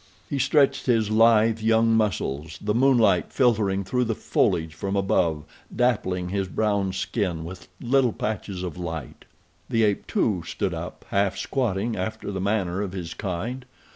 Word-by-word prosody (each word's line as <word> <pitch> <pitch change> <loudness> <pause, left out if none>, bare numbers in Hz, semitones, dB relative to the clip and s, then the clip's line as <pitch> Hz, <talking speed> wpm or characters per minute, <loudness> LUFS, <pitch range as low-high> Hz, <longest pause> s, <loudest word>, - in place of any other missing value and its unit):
He 140 - -2
stretched 140 +1 +2
his 110 -4 +2
lithe 115 0 +4
young 115 +1 +3
muscles, 80 -7 -1
the 105 0 -1
moonlight 115 -7 +3
filtering 105 -7 +2
through 125 +6 0
the 110 -1 -1
foliage 80 -5 0
from 95 +5 -3
above 90 -6 +1 0.3
dappling 95 -7 0
his 95 0 -1
brown 100 -1 0
skin 95 -3 -2
with 90 +2 -9
little 125 0 +2
patches 105 -4 -4
of 90 -1 -5
light. 80 -6 -6 0.4
The 115 -1 +2
ape, 105 -2 0
too, 95 -6 +1
stood - - -3
up, - - -7
half 100 -1 +1
squatting 115 -3 -1
after 105 +3 -4
the 95 -1 -3
manner 100 -2 0
of 100 -3 -4
his 85 -3 -5
kind. 105 +7 -4
100 Hz, 155 wpm, -25 LUFS, 90-115 Hz, 0.4 s, lithe